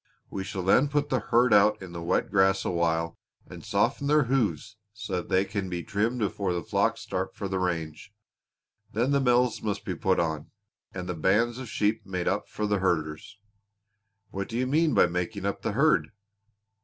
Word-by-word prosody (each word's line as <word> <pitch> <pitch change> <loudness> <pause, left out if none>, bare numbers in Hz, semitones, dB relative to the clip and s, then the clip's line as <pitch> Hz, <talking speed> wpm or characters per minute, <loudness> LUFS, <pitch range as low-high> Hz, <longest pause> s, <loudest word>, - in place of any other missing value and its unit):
We 95 - -3
shall 95 -1 -5
then 125 +10 +4
put 145 0 0
the 130 - +1
herd 120 +1 +3
out 105 +1 +5
in 95 -2 -9
the 85 -1 -6
wet 85 +6 0
grass 95 -1 +3
a - - 0
while 85 -1 0 0.3
and - - -11
soften 140 - 0
their 150 0 +4
hoofs 110 - -1 0.2
so 100 -4 -3
they 95 +2 +1
can 100 -2 -4
be 90 -1 -4
trimmed 110 +5 -1
before 100 -4 -1
the 85 -2 -3
flocks - - 0
start - - -4
for 100 - -4
the 95 -1 -2
range. 85 0 -3 0.8
Then 120 +6 +1
the 140 0 +3
bells 125 -2 +2
must 105 -2 -3
be 95 - -2
put 95 +2 +1
on, 80 -2 -2 0.4
and 90 -1 -6
the 90 - -2
bands 105 +9 +1
of 130 -3 -7
sheep 110 +1 0
made 90 -2 -4
up 100 +2 -1
for 105 - -3
the 105 -1 +1
herders." 80 -2 -2 0.9
"What 100 0 -4
do 115 - -3
you 130 - +1
mean 150 +1 +2
by - - +6
making 90 +3 -3
up 100 - -2
the - - -2
herd?" - - +3
100 Hz, 195 wpm, -27 LUFS, 90-115 Hz, 0.9 s, by